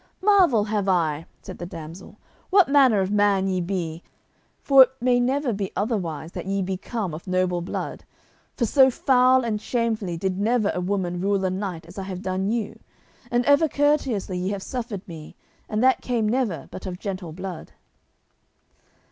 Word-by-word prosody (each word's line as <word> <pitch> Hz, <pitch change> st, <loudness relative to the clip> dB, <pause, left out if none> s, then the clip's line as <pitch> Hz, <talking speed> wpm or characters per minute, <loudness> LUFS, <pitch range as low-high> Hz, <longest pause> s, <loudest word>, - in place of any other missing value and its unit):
"Marvel 370 Hz, -, +5 dB
have 205 Hz, -2 st, -1 dB
I," 165 Hz, -4 st, 0 dB, 0.2 s
said 185 Hz, -, -9 dB
the 175 Hz, -, -5 dB
damsel, 170 Hz, +4 st, -10 dB, 0.3 s
"what 390 Hz, -1 st, +5 dB
manner 265 Hz, -7 st, +5 dB
of 190 Hz, +1 st, -1 dB
man 205 Hz, -2 st, +2 dB
ye 185 Hz, -1 st, 0 dB
be, 170 Hz, -3 st, -3 dB, 0.6 s
for 275 Hz, -1 st, +7 dB
it 260 Hz, -, +7 dB
may 245 Hz, 0 st, +2 dB
never 260 Hz, +1 st, 0 dB
be 195 Hz, -1 st, -3 dB
otherwise 175 Hz, -, -2 dB
but -, -, -6 dB
that -, -, -5 dB
ye 195 Hz, 0 st, 0 dB
be 190 Hz, +1 st, -2 dB
come 195 Hz, -2 st, -4 dB
of 165 Hz, +5 st, -9 dB
noble 185 Hz, -1 st, 0 dB
blood, 170 Hz, -, -5 dB, 0.5 s
for 240 Hz, -, +1 dB
so 265 Hz, +4 st, +5 dB
foul 255 Hz, 0 st, +3 dB
and 210 Hz, -2 st, -2 dB
shamefully 220 Hz, -8 st, -1 dB
did 185 Hz, +2 st, -2 dB
never 220 Hz, 0 st, +1 dB
woman 180 Hz, -2 st, -2 dB
rule 195 Hz, 0 st, +1 dB
a 185 Hz, -, 0 dB
knight 185 Hz, -4 st, -4 dB
as 175 Hz, +4 st, -10 dB
I -, -, -4 dB
have 190 Hz, 0 st, -6 dB
done 190 Hz, +1 st, -1 dB
you, 225 Hz, -2 st, -3 dB, 0.5 s
and 240 Hz, 0 st, +1 dB
ever 285 Hz, +2 st, +4 dB
courteously 270 Hz, -11 st, 0 dB
ye 185 Hz, +1 st, -2 dB
have 200 Hz, -1 st, -4 dB
suffered 230 Hz, -7 st, -5 dB
me, 160 Hz, -3 st, -10 dB, 0.3 s
and 215 Hz, +2 st, 0 dB
that 260 Hz, 0 st, +4 dB
came 235 Hz, -4 st, 0 dB
never 215 Hz, -, -1 dB
but 185 Hz, -, -8 dB
of 180 Hz, -1 st, -5 dB
gentle 185 Hz, -4 st, -5 dB
blood." 185 Hz, +1 st, -8 dB
200 Hz, 180 wpm, -24 LUFS, 185-245 Hz, 0.6 s, for